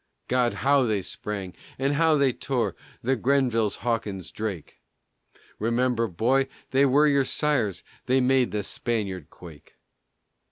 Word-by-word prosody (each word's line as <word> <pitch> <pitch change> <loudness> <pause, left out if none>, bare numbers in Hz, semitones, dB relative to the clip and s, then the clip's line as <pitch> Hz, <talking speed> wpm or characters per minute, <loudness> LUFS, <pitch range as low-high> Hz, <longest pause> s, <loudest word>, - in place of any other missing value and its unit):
God! 125 -1 +1
how 140 -1 +5
they 105 -4 0
sprang! 95 -1 -5 0.2
And 135 +2 0
how 160 +1 +3
they 140 -3 +3
tore! 120 -9 -2 0.3
The 130 +3 +2
Grenvilles, 125 -4 +1
Hawkins, 110 -6 -2
Drake! 100 -7 -6 0.8
Remember, 115 +1 +1
boy, 130 +9 +1 0.2
they 135 +1 +4
were 145 +3 +4
your 140 -2 +3
sires! 130 - 0 0.2
They 130 +1 +3
made 130 -1 +3
the 105 -1 -2
Spaniard 100 -8 -3
quake. 80 -5 -14
120 Hz, 130 wpm, -25 LUFS, 105-135 Hz, 0.8 s, how